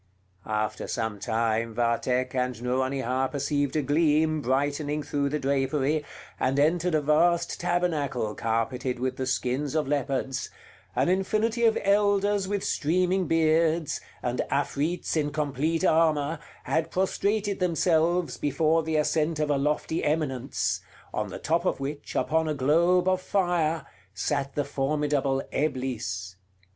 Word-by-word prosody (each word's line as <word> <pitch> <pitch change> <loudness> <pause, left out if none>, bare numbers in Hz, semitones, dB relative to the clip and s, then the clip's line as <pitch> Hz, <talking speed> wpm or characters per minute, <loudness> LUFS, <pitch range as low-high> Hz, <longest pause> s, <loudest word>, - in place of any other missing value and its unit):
After 110 0 -2
some 110 -3 -3
time 115 +1 -1
Vathck 125 +2 0
and 125 -2 -1
Nouronihar 130 +1 0
perceived 145 0 -1
a 155 - +1
gleam 155 +1 +2
brightening 145 +3 0
through 140 -1 -1
the 150 - -1
drapery, 140 +2 0 0.4
and 130 +2 +1
entered 165 +3 +2
a 155 - +2
vast 170 +4 +2
tabernacle 150 -11 0
carpeted 120 +3 -1
with 130 +1 -2
the 130 - -2
skins 130 +3 -1
of 155 -3 +1
leopards; 135 -2 -1 0.5
an - - +2
infinity 215 +5 +1
of 225 - +4
elders 200 0 +2
with 200 0 -2
streaming 180 +4 +1
beards, 160 0 +2 0.2
and 125 0 0
Afrits 145 +5 -1
in 150 -2 +1
complete 150 +3 -1
armor, 155 -2 +2 0.2
had 160 0 0
prostrated 200 +2 0
themselves 170 0 +1
before 160 +3 +2
the 160 0 -2
ascent 155 +1 +1
of 150 -1 +1
a 145 - +2
lofty 150 +3 -1
eminence, 130 - -1 0.3
on - - -1
the - - -6
top 165 +2 0
of 185 - 0
which, 140 +2 -5
upon 160 +1 +1
a 155 - -1
globe 170 +7 +3
of 185 0 +2
fire, 170 -6 0 0.3
sat 140 -2 -2
the 145 - 0
formidable 140 -1 0
Eblis. 115 -10 -2
150 Hz, 135 wpm, -27 LUFS, 130-165 Hz, 0.5 s, of